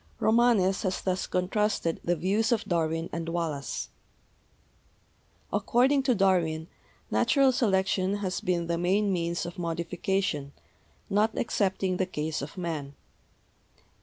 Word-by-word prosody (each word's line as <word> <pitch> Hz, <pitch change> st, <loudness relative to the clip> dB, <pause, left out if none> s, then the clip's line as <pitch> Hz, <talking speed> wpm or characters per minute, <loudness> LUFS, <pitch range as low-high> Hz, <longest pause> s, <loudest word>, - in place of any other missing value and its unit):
Romanes 220 Hz, -4 st, +3 dB
has 185 Hz, -2 st, -1 dB
thus 185 Hz, -1 st, -1 dB
contrasted 185 Hz, -2 st, 0 dB
the 175 Hz, -, +1 dB
views 200 Hz, +8 st, +1 dB
of 230 Hz, -2 st, +2 dB
Darwin 165 Hz, -3 st, 0 dB
and 165 Hz, 0 st, -3 dB
Wallace: 165 Hz, -5 st, -3 dB, 1.6 s
According 265 Hz, +4 st, +3 dB
to 260 Hz, -2 st, +2 dB
Darwin, 170 Hz, -5 st, +1 dB, 0.4 s
Natural 275 Hz, -2 st, +4 dB
Selection 190 Hz, -4 st, +1 dB
has 200 Hz, -1 st, -3 dB
been 180 Hz, -4 st, 0 dB
the 170 Hz, 0 st, -1 dB
main 195 Hz, +3 st, +2 dB
means 170 Hz, -1 st, -1 dB
of 175 Hz, +1 st, -7 dB
modification, 170 Hz, -2 st, -2 dB, 0.5 s
not 210 Hz, +2 st, +1 dB
excepting 190 Hz, -4 st, 0 dB
the 185 Hz, -, 0 dB
case 155 Hz, -3 st, -3 dB
of 145 Hz, +5 st, -7 dB
Man. 155 Hz, -6 st, -4 dB
185 Hz, 120 wpm, -28 LUFS, 170-205 Hz, 1.6 s, Natural